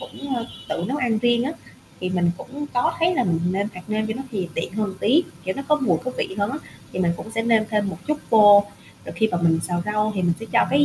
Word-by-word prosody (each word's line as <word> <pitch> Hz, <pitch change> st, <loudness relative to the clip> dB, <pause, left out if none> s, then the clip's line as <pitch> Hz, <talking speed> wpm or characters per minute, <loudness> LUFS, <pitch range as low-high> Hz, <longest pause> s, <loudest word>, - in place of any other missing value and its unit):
cũng, 275 Hz, 0 st, -6 dB
ơ, 235 Hz, -2 st, -3 dB, 0.2 s
tự 170 Hz, -, -2 dB
nấu 270 Hz, -, -1 dB
ăn 245 Hz, -6 st, +1 dB
riêng 240 Hz, +1 st, +2 dB
á. 280 Hz, -, -2 dB, 0.5 s
Thì 185 Hz, -, -2 dB
mình 175 Hz, -2 st, +2 dB
cũng 290 Hz, +3 st, -7 dB
có 280 Hz, +7 st, +2 dB
thấy 345 Hz, +2 st, +3 dB
là -, -, +2 dB
mình 165 Hz, -2 st, +1 dB
nêm 200 Hz, +2 st, 0 dB
hạt 180 Hz, -, -8 dB
nêm 215 Hz, 0 st, 0 dB
vô 220 Hz, -, -2 dB
nó 265 Hz, -, -4 dB
thì 190 Hz, -6 st, -3 dB
tiện 165 Hz, -, -3 dB
hơn 205 Hz, -1 st, -2 dB
tí, 285 Hz, +11 st, +4 dB, 0.2 s
kiểu, 190 Hz, +1 st, -1 dB
nó 275 Hz, -, -3 dB
có 300 Hz, -, +5 dB
mùi 255 Hz, -, +3 dB
có 255 Hz, -, -1 dB
vị 190 Hz, -, -2 dB
hơn 200 Hz, +2 st, +1 dB
á, 280 Hz, -, -4 dB, 0.3 s
thì -, -, -5 dB
mình 175 Hz, -2 st, +2 dB
cũng 220 Hz, -, -8 dB
sẽ 225 Hz, 0 st, -1 dB
nêm 225 Hz, -1 st, +4 dB
thêm 210 Hz, -2 st, +1 dB
một -, -, -6 dB
chút 305 Hz, 0 st, +1 dB
vô, 205 Hz, -2 st, +8 dB, 0.4 s
rồi -, -, -7 dB
khi 220 Hz, -, +3 dB
mà 175 Hz, -, -1 dB
mình 165 Hz, -1 st, +3 dB
xào 175 Hz, -1 st, -1 dB
rau 210 Hz, +1 st, +1 dB
thì 190 Hz, -, -1 dB
mình 175 Hz, -1 st, +3 dB
sẽ 225 Hz, -, -6 dB
cho 235 Hz, -, +4 dB
cái 285 Hz, +1 st, +5 dB
215 Hz, 280 wpm, -23 LUFS, 190-250 Hz, 0.5 s, vô